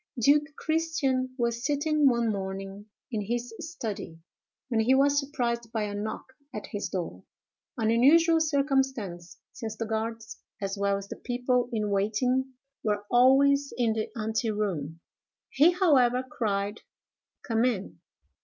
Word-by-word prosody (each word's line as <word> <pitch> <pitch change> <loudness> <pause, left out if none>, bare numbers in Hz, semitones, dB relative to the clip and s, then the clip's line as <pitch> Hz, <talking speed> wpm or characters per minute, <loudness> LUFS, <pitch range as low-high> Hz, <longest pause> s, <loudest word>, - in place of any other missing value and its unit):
Duke 290 +5 +4
Christian 280 -6 0
was 235 -1 -1
sitting 295 0 +2
one 235 -2 +1
morning 195 +1 -5 0.2
in 220 -3 -1
his 240 +3 -3
study, 220 - -6 0.5
when 235 -3 0
he 245 +4 +4
was 280 +1 +4
surprised 240 -5 -2
by 220 -2 -1
a 205 -1 -3
knock 205 +2 -4 0.3
at 210 - -5
his 205 - -3
door—an 185 - -5
unusual 325 +8 +5
circumstance, 270 - -1 0.2
since 220 -1 -6
the 225 - -2
guards 220 0 -4 0.2
as 195 0 -3
well 200 0 +1
as 200 0 -8
the - - -7
people 245 0 0
in 210 -3 -1
waiting 250 +7 0 0.3
were 205 -1 -1
always 275 +3 +5
in 235 -3 +2
the 220 -1 -2
ante 220 +2 -1
room. 170 -8 -2 0.5
He, 295 +5 +5
however, 260 -9 +3
cried, 205 -3 -2 0.6
"Come 225 -1 +1
in!" 225 -6 -1
235 Hz, 135 wpm, -28 LUFS, 210-270 Hz, 0.6 s, unusual